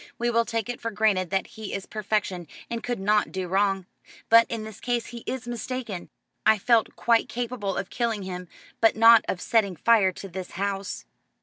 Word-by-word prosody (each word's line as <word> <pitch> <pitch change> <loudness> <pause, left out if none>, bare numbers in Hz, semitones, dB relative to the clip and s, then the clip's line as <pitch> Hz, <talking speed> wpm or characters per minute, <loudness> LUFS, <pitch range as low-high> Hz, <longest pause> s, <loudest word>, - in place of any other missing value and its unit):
"We 240 0 0
will 230 0 +2
take 230 -2 -2
it 245 -1 -5
for 230 - -2
granted 205 -4 +1
that 190 -1 0
he 220 -2 -8
is 195 - -5
perfection 205 -5 -2 0.2
and 235 -1 -2
could 245 -3 -3
not 210 +2 +2
do 185 -1 -3
wrong. 195 0 +1 0.4
But 230 0 +7
in 230 -2 -3
this 215 -1 -9
case 240 -2 -1
he 240 - -8
is 255 -2 -4
mistaken. 240 -5 -5 0.3
I 220 0 +5
felt 230 +2 +2
quite 230 -1 +2
capable 230 -5 -3
of 195 - -4
killing 230 -4 -1
him, 180 -1 -6 0.3
but 225 - +4
not 225 +1 +7
of 180 - -1
setting 205 -4 +1
fire 205 +2 +4
to 195 - -9
this 185 0 -7
house." 195 +1 -3
215 Hz, 195 wpm, -26 LUFS, 195-230 Hz, 0.4 s, But